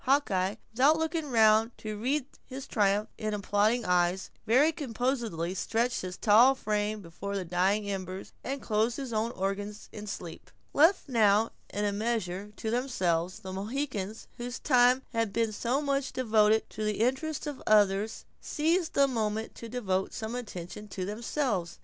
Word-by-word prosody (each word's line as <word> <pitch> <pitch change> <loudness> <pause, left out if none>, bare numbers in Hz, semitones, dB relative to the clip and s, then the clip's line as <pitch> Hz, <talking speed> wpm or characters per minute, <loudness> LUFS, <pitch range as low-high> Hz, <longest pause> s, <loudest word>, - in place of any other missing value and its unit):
Hawkeye, 210 -8 +2 0.2
without 275 +7 +4
looking 320 -1 -2
round 225 -1 +4
to 215 -1 -5
read 255 +6 0 0.2
his 265 +1 -7
triumph 205 0 +1
in 215 -1 -1
applauding 210 +4 +1
eyes, 180 +1 +1 0.2
very 270 +8 +5
composedly 235 - -2
stretched 230 +5 0
his 185 0 -6
tall 235 +5 +6
frame 210 -2 -2
before 190 +4 -6
the 190 -2 -2
dying 190 +4 +1
embers, 190 -1 -5
and 275 0 -4
closed 220 +2 +1
his 265 -4 -5
own 220 +1 0
organs 200 +2 -4
in 210 0 -8
sleep. 175 -5 -7 0.2
Left 325 +6 +4
now 220 -3 +3 0.2
in 205 +1 -1
a 205 - +1
measure 205 -2 -2
to 220 - -3
themselves, 185 -9 0
the 190 0 -7
Mohicans, 215 0 -3
whose 245 +1 -5
time 250 -1 +4
had 230 -2 0
been 225 +1 0
so 245 +7 -1
much 275 -1 -1
devoted 220 -3 +3
to 215 - -5
the 215 0 -1
interests 265 +6 0
of 290 -3 -5
others, 210 0 +3 0.2
seized 325 +3 0
the 280 0 +5
moment 220 -3 -2
to 230 - -9
devote 195 -6 -1
some 220 +1 -4
attention 210 -4 -6
to 190 -2 -4
themselves. 210 - -2
220 Hz, 160 wpm, -29 LUFS, 200-250 Hz, 0.2 s, tall